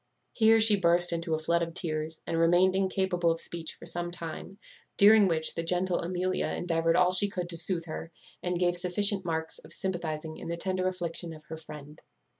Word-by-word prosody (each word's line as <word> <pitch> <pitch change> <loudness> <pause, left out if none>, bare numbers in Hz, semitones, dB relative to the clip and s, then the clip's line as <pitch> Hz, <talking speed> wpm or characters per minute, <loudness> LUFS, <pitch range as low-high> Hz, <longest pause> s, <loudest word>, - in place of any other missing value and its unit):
Here 225 0 +5
she 215 -2 +5
burst 175 0 +3
into 165 -1 -1
a - - -1
flood 170 +2 0
of 165 0 -4
tears, 155 -2 -3
and 165 - -1
remained 175 +3 +4
incapable 190 -2 +1
of 165 0 0
speech 165 -1 -4
for - - -13
some 175 0 -3
time; 175 +2 -8 0.4
during 205 0 +7
which 160 -2 +1
the 165 - -3
gentle 180 +2 0
Amelia 185 +1 -1
endeavoured 165 -1 0
all 180 0 +4
she 200 +2 +4
could 180 -3 -4
to 170 - -3
soothe 170 0 -1
her, 165 0 -7 0.3
and 180 0 -2
gave 175 -1 +2
sufficient 190 +3 +1
marks 160 -1 -3
of - - -15
sympathizing 160 -4 -4
in - - -8
the 170 0 -3
tender 185 +1 -1
affliction 175 -2 -4
of 155 -1 -12
her 160 - -6
friend. 150 -1 -11
175 Hz, 200 wpm, -29 LUFS, 165-185 Hz, 0.4 s, during